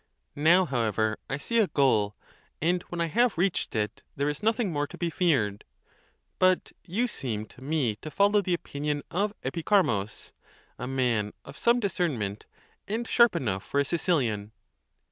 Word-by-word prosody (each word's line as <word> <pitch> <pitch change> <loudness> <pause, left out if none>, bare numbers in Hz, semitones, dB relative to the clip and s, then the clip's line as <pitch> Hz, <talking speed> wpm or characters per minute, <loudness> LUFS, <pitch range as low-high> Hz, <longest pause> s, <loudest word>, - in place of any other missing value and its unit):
Now, 170 +6 +5
however, 110 - 0
I 140 - -1
see 230 +11 0
a 215 - +4
goal, 110 -9 +2 0.4
and 175 +3 +1
when 175 - -5
I 170 - +2
have 235 +5 +2
reached 180 -6 0
it, 105 0 -2
there 140 +1 0
is 150 - -4
nothing 220 -3 +1
more 145 0 0
to - - -11
be 170 -1 -1
feared; 125 - +1 0.8
but 185 0 +3
you 220 +8 0
seem 110 - -4
to 125 - -16
me 135 -7 0
to 155 - -8
follow 205 +4 +3
the 180 -2 +1
opinion 145 -2 -3
of 200 +4 0
Epicharmus,' 150 - 0 0.5
a 125 - -4
man 120 -6 0
of 140 - -10
some 235 +1 +4
discernment, 145 - -2 0.4
and 225 +3 -2
sharp 235 -5 +5
enough 105 - -1
for 140 - -1
a 140 - +2
Sicilian. 125 - 0
150 Hz, 165 wpm, -28 LUFS, 115-185 Hz, 0.8 s, Now